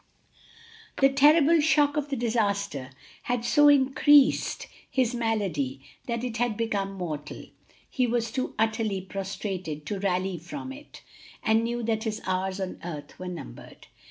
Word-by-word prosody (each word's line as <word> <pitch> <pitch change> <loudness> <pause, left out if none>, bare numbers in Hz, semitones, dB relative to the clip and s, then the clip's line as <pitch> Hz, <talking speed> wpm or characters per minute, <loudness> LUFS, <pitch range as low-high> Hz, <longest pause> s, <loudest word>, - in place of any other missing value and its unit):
The 270 - +6
terrible 300 +4 +5
shock 295 -1 +3
of 295 -1 -2
the 275 - -1
disaster 200 - -1 0.4
had 245 -1 0
so 295 +3 +5
increased 280 0 +4 0.2
his 255 -2 +1
malady 195 - -1 0.3
that 235 -1 -2
it 240 -2 -3
had 235 -2 0
become 200 -4 -1
mortal; 160 -6 -6 0.4
he 255 -2 0
was 230 -1 -1
too 260 +1 -3
utterly 220 -3 0
prostrated 190 -5 -5
to 200 +4 -3
rally 185 -2 -1
from 265 - -7
it, 290 +2 -13 0.4
and 220 +1 +3
knew 240 +1 -2
that 220 0 -1
his 220 0 -2
hours 185 +1 -1
on 190 -1 -4
earth 150 -4 -8
were 185 - -6
numbered. 170 - -9
220 Hz, 145 wpm, -27 LUFS, 190-255 Hz, 0.4 s, The